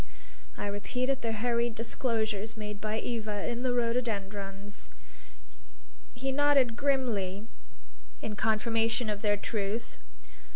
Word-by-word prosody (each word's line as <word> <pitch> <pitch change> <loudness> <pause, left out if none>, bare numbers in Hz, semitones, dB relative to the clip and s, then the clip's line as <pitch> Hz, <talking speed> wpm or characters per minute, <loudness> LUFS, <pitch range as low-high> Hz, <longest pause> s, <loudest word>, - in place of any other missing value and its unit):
I - - -2
repeated 250 +7 0
the 230 - 0
hurried 235 +1 +1
disclosures 225 -2 0
made 210 -1 -5
by 215 0 0
Eva 220 -3 -2
in 240 0 -1
the 255 -1 +2
rhododendrons. 205 -4 -1 1.3
He 265 +2 -1
nodded 275 -4 +4
grimly 225 -8 +1 0.7
in 215 - -3
confirmation 225 +1 +2
of 205 -1 -3
their 205 -1 +3
truth. 210 +2 -2
225 Hz, 110 wpm, -31 LUFS, 205-245 Hz, 1.3 s, nodded